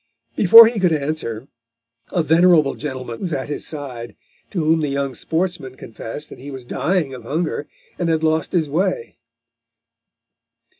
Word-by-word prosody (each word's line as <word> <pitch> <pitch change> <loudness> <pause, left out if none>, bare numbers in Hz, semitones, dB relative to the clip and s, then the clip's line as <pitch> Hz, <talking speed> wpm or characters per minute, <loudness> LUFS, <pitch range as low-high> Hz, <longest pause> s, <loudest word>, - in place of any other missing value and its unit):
Before 225 +4 +9
he 225 -1 0
could 180 -3 +2
answer, 140 -6 -3 0.6
a 175 - +1
venerable 160 -2 +4
gentleman 130 -5 -6
was 175 -4 -3
at 135 0 -3
his 145 - -4
side, 130 -6 -7 0.3
to 175 -5 -2
whom 160 +1 +3
the 150 - 0
young 140 -1 -2
sportsman 165 -4 -3
confessed 115 +4 -8
that - - -11
he 140 +3 -9
was 130 -3 -8
dying 155 +1 -1
of 125 - -8
hunger 150 +4 -3 0.3
and 175 -2 0
had 160 -1 0
lost 160 0 +1
his 165 -4 +1
way. 170 -5 -2
155 Hz, 155 wpm, -20 LUFS, 135-170 Hz, 0.6 s, Before